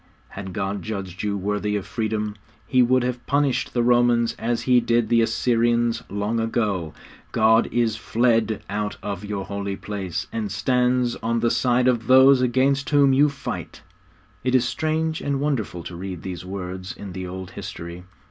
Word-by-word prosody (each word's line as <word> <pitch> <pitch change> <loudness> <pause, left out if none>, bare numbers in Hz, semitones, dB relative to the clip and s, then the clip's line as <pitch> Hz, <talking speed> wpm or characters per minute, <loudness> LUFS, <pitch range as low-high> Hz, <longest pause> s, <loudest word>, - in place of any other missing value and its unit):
Had 95 -1 -7
God 95 +2 -3
judged 95 -3 -5
you 105 -1 -1
worthy 105 +1 -1
of 100 - -3
freedom, 110 -2 -2 0.3
He 130 -2 +3
would 125 +1 +3
have 125 0 -3
punished 140 -2 +1
the 120 - +2
Romans 120 -1 +3
as 115 +1 -1
He 125 -1 +5
did 115 -1 +1
the 115 -1 +4
Assyrians 115 0 +1
long 105 +3 -1
ago. 105 -8 -1 0.4
God 110 +1 +4
is 115 -2 +1
fled 115 -1 +1
out 105 -1 -3
of 100 -2 -4
your 100 -2 -4
holy 100 -1 -4
place, 95 -4 -4
and 110 -3 -3
stands 125 +3 +1
on 115 0 -1
the 115 - +2
side 125 0 +2
of 120 -3 +1
those 130 0 +7
against 135 +3 +2
whom 140 -2 +5
you 145 +3 +5
fight!' 140 0 -6 0.6
It 130 +1 +1
is 125 -1 +4
strange 160 +3 -1
and 140 -1 -1
wonderful 120 - -2
to 85 - -7
read 90 -1 -6
these 90 -2 -5
words 95 0 -6
in 100 - -8
the 95 0 -5
old 95 0 -7
history. 85 +1 -7
115 Hz, 170 wpm, -23 LUFS, 100-125 Hz, 0.6 s, those